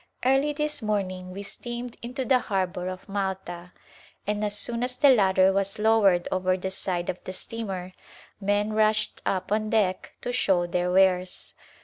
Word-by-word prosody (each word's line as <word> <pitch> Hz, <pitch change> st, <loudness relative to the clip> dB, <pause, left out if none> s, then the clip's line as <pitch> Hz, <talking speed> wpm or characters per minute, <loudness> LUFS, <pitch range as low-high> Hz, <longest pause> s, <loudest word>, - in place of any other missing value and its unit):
Early 270 Hz, +3 st, +3 dB
this 300 Hz, -1 st, -2 dB
morning 190 Hz, -4 st, -2 dB
we 195 Hz, +2 st, -7 dB
steamed 240 Hz, +3 st, -6 dB
into 255 Hz, +3 st, -4 dB
the 260 Hz, -1 st, +4 dB
harbor 185 Hz, -4 st, -2 dB
of 185 Hz, 0 st, -6 dB
Malta, 190 Hz, -3 st, -4 dB, 0.5 s
and 210 Hz, +1 st, -1 dB
as 210 Hz, 0 st, +1 dB
soon 235 Hz, +1 st, -1 dB
as 250 Hz, 0 st, -2 dB
the 285 Hz, -2 st, +7 dB
ladder 190 Hz, -4 st, +4 dB
was 195 Hz, 0 st, 0 dB
lowered 210 Hz, -5 st, +4 dB
over 185 Hz, 0 st, +1 dB
the 190 Hz, +1 st, -4 dB
side 180 Hz, -2 st, -2 dB
of 180 Hz, -, -4 dB
the 185 Hz, -, -6 dB
steamer 190 Hz, -3 st, -5 dB, 0.5 s
men 205 Hz, +1 st, +1 dB
rushed 215 Hz, 0 st, +1 dB
up 190 Hz, +1 st, -1 dB
on 215 Hz, 0 st, +1 dB
deck 200 Hz, -5 st, 0 dB
to 245 Hz, -, -3 dB
show 190 Hz, -7 st, +2 dB
their 180 Hz, +1 st, 0 dB
wares. 185 Hz, -1 st, +2 dB
195 Hz, 165 wpm, -26 LUFS, 185-220 Hz, 0.5 s, the